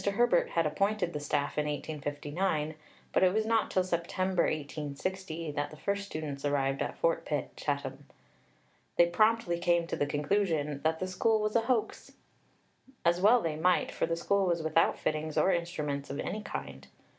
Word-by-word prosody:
Herbert 200 -2 +3
had 165 -1 +1
appointed 195 +3 0
the 150 - -2
staff 145 0 -1
in 150 - 0
1859, 150 +2 -2 0.4
but - - +3
it 185 -1 +5
was 215 +2 +1
not 225 -1 +2
till 185 - +2
September 185 +1 0
1860 155 +3 -3
that 145 0 -2
the 155 - -12
first 200 +4 -2
students 150 -5 -5
arrived 140 -1 0
at - - -3
Fort - - +1
Pitt, - - -3
Chatham. - - -3 0.9
They 175 - +7
promptly 215 -1 +2
came 170 -1 +2
to - - -3
the 145 - 0
conclusion 150 -1 0
"that 160 0 +1
the 185 - -2
School 220 +4 +2
was 215 0 -1
a 230 - +5
hoax." 230 -1 -1 0.9
As 175 +1 +3
well 230 +4 +6
they 160 -2 -1
might, 180 +3 +2
for - - -1
the 165 - 0
School 200 +2 +1
was 170 -2 0
without 160 +1 +3
fittings 155 0 -2
or 190 - +4
instruments 150 -5 -2
of 140 - -4
any 215 - -3
kind! - - -7
170 Hz, 175 wpm, -30 LUFS, 150-195 Hz, 0.9 s, They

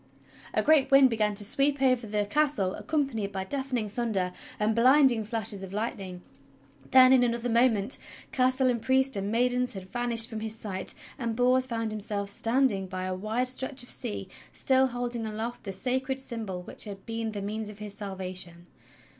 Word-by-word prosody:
A - - +2
great 305 -3 +4
wind 270 -2 +6
began 210 -2 +1
to 205 - +2
sweep 275 +5 +1
over 255 -3 +2
the 210 0 0
castle 210 -6 +1
accompanied 270 -10 -2
by 190 -1 -3
deafening 255 0 -2
thunder 205 -5 -2 0.3
and 215 +1 +2
blinding 255 0 +5
flashes 215 -2 -2
of 190 0 -8
lightning; 195 -4 -4 0.7
then, 260 0 +8
in 260 - +6
another 240 0 0
moment, 230 -1 +2 0.3
castle 255 0 +2
and 235 -2 -2
priest 265 +2 +3
and 200 +1 -2
maidens 250 +2 +1
had 190 -2 -7
vanished 235 +1 +1
from 220 -3 -5
his 220 0 -3
sight, 195 -4 -3 0.2
and 230 -3 -2
Bors 255 +1 +3
found 225 -2 -2
himself 205 -1 -2
standing 225 -2 +2
by 185 0 -5
a 185 0 -2
wide 220 +7 -1
stretch 260 0 -1
of 245 - -9
sea, 100 -1 -4 0.2
still 265 0 +2
holding 240 -2 -3
aloft 225 +3 -5
the 195 - -3
sacred 260 +6 -1
symbol 220 -8 -5
which - - -5
had 200 -2 -9
been 225 -1 -3
the 205 - -4
means 215 +1 -4
of 210 - -10
his 210 -1 -7
salvation. 185 -4 -5
225 Hz, 180 wpm, -28 LUFS, 205-255 Hz, 0.7 s, then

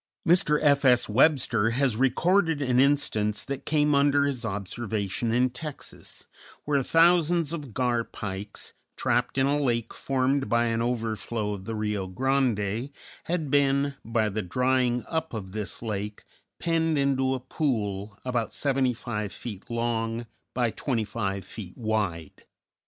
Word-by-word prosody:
Mr. 160 -3 +4
F. 140 -1 +4
S. 125 -2 +5
Webster 125 -2 +3
has 125 0 +1
recorded 160 - +2
an 125 -3 +2
instance 130 -7 +2
that 140 -1 -6
came 150 -1 +3
under 140 0 +4
his 135 -4 -2
observation 105 +1 -2
in 125 +2 +2
Texas, 145 +3 -7 0.4
where 145 -2 +2
thousands 165 +1 +3
of 145 -9 -6
gar 120 -2 +1
pikes, 100 -2 -6 0.2
trapped 125 +2 0
in 135 - +4
a 145 +1 +2
lake 120 -4 0
formed 135 +1 0
by 120 0 +3
an 115 0 0
overflow 110 -3 -2
of 95 -2 -7
the 115 - -3
Rio 105 -3 -2
Grande, 120 0 0 0.4
had 160 -5 -2
been, 140 0 +3
by 115 -1 +1
the 105 +1 -2
drying 125 +3 +1
up 160 -5 -2
of 95 -4 -6
this 105 +2 -4
lake, 105 -1 -4 0.4
penned 165 -2 +1
into 135 -1 +2
a - - -3
pool 110 -7 -2
about 120 -3 -1
seventy 135 -3 +1
five 105 -4 -4
feet 105 -6 -8
long 115 0 -1 0.3
by 120 -2 +1
twenty 120 -3 -1
five 100 -4 -3
feet 100 -2 -9
wide. 105 - -2
125 Hz, 145 wpm, -27 LUFS, 110-140 Hz, 0.4 s, S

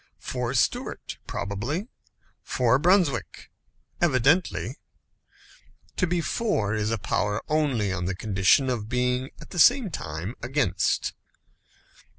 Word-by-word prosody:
For 125 0 -3
Stuart, 120 - -1
probably; 115 - -3 0.5
for 125 0 +2
Brunswick, 175 -5 +1 0.5
evidently. 130 - +2 1.2
To 185 - +2
be 175 0 0
For 155 - 0
is 105 0 0
a 115 - 0
power 105 +1 -1
only 135 -10 +1
on 90 -1 -3
the 95 +1 -2
condition 95 +6 +3
of 115 -4 -2
being 125 +1 0
at - - -13
the 175 - -4
same 245 - +5
time 80 - -5
Against. 135 +3 0
125 Hz, 115 wpm, -26 LUFS, 105-155 Hz, 1.2 s, same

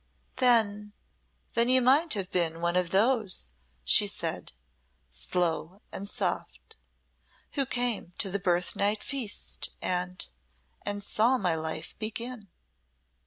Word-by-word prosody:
"Then 215 -5 +2 0.6
then 235 +1 +3
you 255 0 +6
might 275 +4 +4
have 195 -2 -3
been 165 -2 +1
one 170 +1 0
of 180 -2 +1
those," 205 - +2 0.3
she 60 - +5
said, - - -2 0.6
slow 180 +2 -2
and 200 +1 -6
soft, 65 0 -3 0.8
"who 275 -2 0
came 245 -8 0
to 195 - +1
the 200 - -1
birthnight 190 +4 0
feast 255 -7 -2
and 180 0 -2 0.5
and 205 0 -3
saw 235 +6 +2
my 180 -7 +1
life 160 0 -4
begin." 225 0 -4
205 Hz, 120 wpm, -28 LUFS, 180-235 Hz, 0.8 s, you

